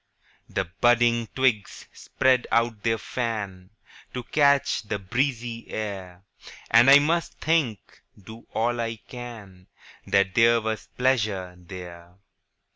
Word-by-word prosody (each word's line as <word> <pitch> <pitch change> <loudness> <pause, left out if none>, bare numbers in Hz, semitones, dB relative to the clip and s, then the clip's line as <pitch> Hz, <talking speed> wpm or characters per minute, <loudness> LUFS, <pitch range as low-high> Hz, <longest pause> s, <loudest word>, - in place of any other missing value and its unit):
The - - -1
budding 120 +5 +2
twigs 125 -6 0
spread 130 -1 +1
out 115 -2 +1
their 115 +1 +1
fan, 105 -7 -4 0.5
To 125 - -4
catch 140 +2 +2
the 105 -1 -4
breezy 120 +3 -3
air; 95 -4 -6 0.5
And 120 +3 +7
I 140 - +10
must 165 +4 0
think, 155 -10 -1 0.2
do 110 +4 -13
all 120 +1 0
I 115 0 -3
can, 110 -6 -11 0.4
That 100 -1 +2
there 115 +2 +5
was 110 -1 -4
pleasure 105 -8 0
there. 90 -1 -11
115 Hz, 120 wpm, -25 LUFS, 100-120 Hz, 0.5 s, I